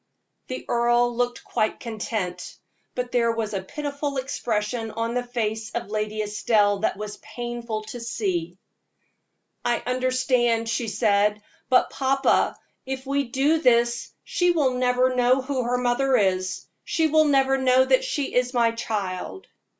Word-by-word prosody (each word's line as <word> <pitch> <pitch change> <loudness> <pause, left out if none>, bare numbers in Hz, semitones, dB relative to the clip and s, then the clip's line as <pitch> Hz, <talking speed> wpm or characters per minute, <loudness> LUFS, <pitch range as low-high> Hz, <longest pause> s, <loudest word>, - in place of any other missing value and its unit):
The 255 - -6
earl 240 0 +2
looked 245 0 -1
quite 220 -2 -1
content, 215 -5 -4 0.4
but 250 0 -3
there 235 -2 +2
was 225 -2 -3
a 195 - -1
pitiful 285 +5 -4
expression 230 -3 -2
on 230 +1 -3
the 245 - 0
face 225 -3 -3
of 230 -4 -4
Lady 215 0 -1
Estelle 210 -1 +2
that 205 - 0
was 210 0 -6
painful 240 -2 -5
to 215 +3 -8
see. 190 -7 -2 1.1
"I 240 -1 0
understand," 250 -2 +1
she 230 0 -1
said; 210 0 +2 0.3
"but, 255 - +4
papa, 270 0 +2 0.3
if 265 0 -5
we 280 +1 0
do 275 +6 +2
this 235 -4 +2
she 355 0 +1
will 305 -7 +3
never 250 0 +2
know 250 +1 +4
who 270 0 -2
is 250 - 0
her 250 +1 +1
mother. 245 -6 +2 0.4
She 325 -1 0
will 310 0 +4
never 270 -2 +3
know 260 0 +4
that - - +3
she 305 - -2
is 250 +1 +1
my 235 -1 +4
child." 210 - -4
240 Hz, 150 wpm, -24 LUFS, 215-260 Hz, 1.1 s, but